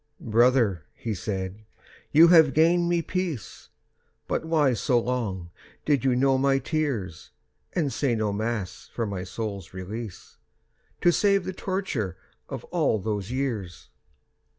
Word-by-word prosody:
"Brother," 115 - +3
he 115 - -4
said, 95 +1 -4 0.5
"you 165 +3 +8
have 160 -5 +6
gained 170 +2 +4
me 170 -1 +1
peace, 175 - -4 0.6
But - - -1
why 155 -5 +3
so 120 +2 +2
long 105 -8 -3 0.3
did 145 -5 +2
you 130 -2 +3
know 135 +1 +3
my 135 0 +3
tears, 130 - -2 0.4
And 150 -6 0
say 130 -5 +1
no 110 -2 0
Mass 105 -4 -3
for 115 - -1
my 100 -3 -4
soul's 100 -2 -6
release, 100 +1 -7 0.6
To 175 - +5
save 200 +1 +3
the 185 - -3
torture 180 - -3 0.3
of - - -5
all - - +2
those 105 -1 -3
years?" 120 -9 -3
120 Hz, 135 wpm, -26 LUFS, 100-150 Hz, 0.6 s, you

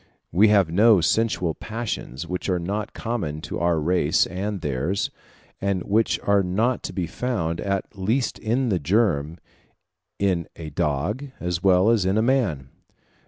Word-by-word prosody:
We 100 +7 +5
have 100 -6 +4
no 105 +3 +6
sensual 90 -2 +1
passions 110 - -5
which 90 +2 -4
are 90 - +2
not 100 +5 -4
common 95 -11 -3
to - - -5
our 85 -2 +2
race 90 +4 +2
and 95 +2 -4
theirs, 75 +8 -1 0.5
and 100 -3 0
which 110 +2 +1
are 100 0 +4
not 110 +7 0
to - - -4
be 90 -3 -2
found, 85 -4 -2
at 100 +1 -2
least 110 +6 -1
in 120 +3 0
the 95 -4 +1
germ, 85 -3 +1 0.8
in 95 -4 0
a 80 -2 -8
dog 85 - -1
as 90 -1 -2
well 95 +3 +4
as 115 -5 +3
in 95 +3 +1
a 110 - +3
man. 105 - 0
95 Hz, 160 wpm, -24 LUFS, 85-110 Hz, 0.8 s, no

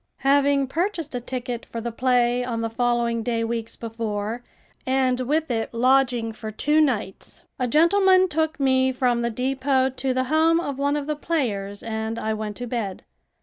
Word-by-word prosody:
Having 280 0 +4
purchased 330 +2 -2
a 245 - -3
ticket 245 -1 -4
for 230 - -6
the 235 +1 -4
play 245 0 +2
on 235 -2 -3
the 225 0 -2
following 235 -1 0
day 230 0 -1
weeks 230 0 -3
before, 225 0 -4 0.4
and 260 -1 +1
with 300 +3 0
it 225 -1 -2
lodging 250 -2 +2
for 220 0 -7
two 295 +8 +2
nights, 215 -10 -2 0.2
a 250 - 0
gentleman 370 +6 +4
took 315 -3 -1
me 260 -1 +3
from 250 -2 +1
the 235 - 0
depot 265 +2 0
to 265 +1 -2
the 255 0 +1
home 320 +4 +3
of 280 -5 -4
one 285 +1 +1
of 290 - -3
the 300 +1 -2
players 215 -11 -2
and 220 0 -3
I 220 -1 -1
went 215 -1 -4
to 245 - -5
bed. 225 -6 -4
250 Hz, 180 wpm, -24 LUFS, 230-280 Hz, 0.4 s, Having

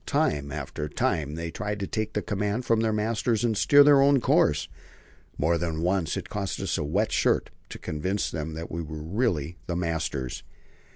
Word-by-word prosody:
Time 70 -1 0
after 75 +3 -4
time 75 0 -1
they 85 0 -4
tried 105 0 -4
to 100 - -2
take 110 +2 -3
the 105 - -1
command 105 +4 -2
from 115 -1 +3
their 110 0 +1
masters 110 +1 0
and 115 -2 +1
steer 145 +7 +6
their 145 -1 +6
own 140 0 +5
course. 75 -10 +2 0.7
More 85 +3 +2
than 80 -1 -2
once 90 -3 0
it - - -5
cost 100 -2 -3
us 95 -2 -1
a - - -1
wet 75 - 0
shirt - - +1 0.2
to - - -7
convince 95 +6 -2
them 80 0 -4
that 80 +1 -6
we 85 - -3
really 80 - -2
were - - -30
the 85 - -2
masters. 80 -7 -2
90 Hz, 190 wpm, -27 LUFS, 80-110 Hz, 0.7 s, steer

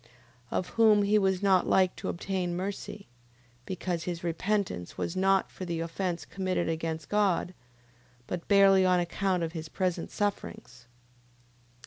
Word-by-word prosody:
Of 180 - -2
whom 215 -2 +4
he 210 +1 +3
was 190 -1 +1
not 190 -2 +4
like 185 -1 +3
to - - -4
obtain 180 -1 -2
mercy... 200 +2 -5 0.6
Because 175 -3 -3
his 175 -1 -4
repentance 180 - -2
was 170 - -3
not 195 0 +2
for - - -8
the 170 -2 -3
offence 170 +1 -3
committed 185 -2 -2
against 160 -1 -3
God: 200 -3 +1 0.7
but 175 +4 -5
barely 195 -1 +6
on 180 -1 +4
account 180 +1 0
of 165 - -2
his 160 -2 -6
present 180 -2 -2
sufferings. 130 -11 -4
185 Hz, 140 wpm, -29 LUFS, 170-195 Hz, 0.7 s, barely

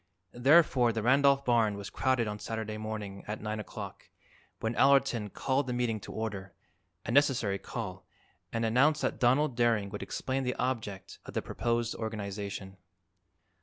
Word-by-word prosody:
Therefore 130 -2 +5
the 110 -1 -3
Randolph 140 +2 +4
barn 115 -4 +3
was 100 -1 -7
crowded 130 -3 +1
on 105 0 -4
Saturday 110 -1 -4
morning 105 -2 -5
at 105 +1 -4
9 110 0 -3
o'clock, 105 - -8 0.5
when 115 +1 -1
Allerton 135 -6 +3
called 135 +6 -1
the 125 - -1
meeting 120 -3 0
to - - -9
order 100 -4 -5 0.5
a - - -2
necessary 120 -7 +3
call - - -6 0.4
and 115 0 -1
announced 140 +7 +3
that - - -1
Donald 130 +2 +3
Daring 115 -4 +2
would 105 - -5
explain 135 +1 -2
the 125 0 -1
object 115 -6 -3
of - - -9
the - - +1
proposed 120 0 -1
organization. 100 -3 -5
115 Hz, 155 wpm, -30 LUFS, 105-130 Hz, 0.5 s, Therefore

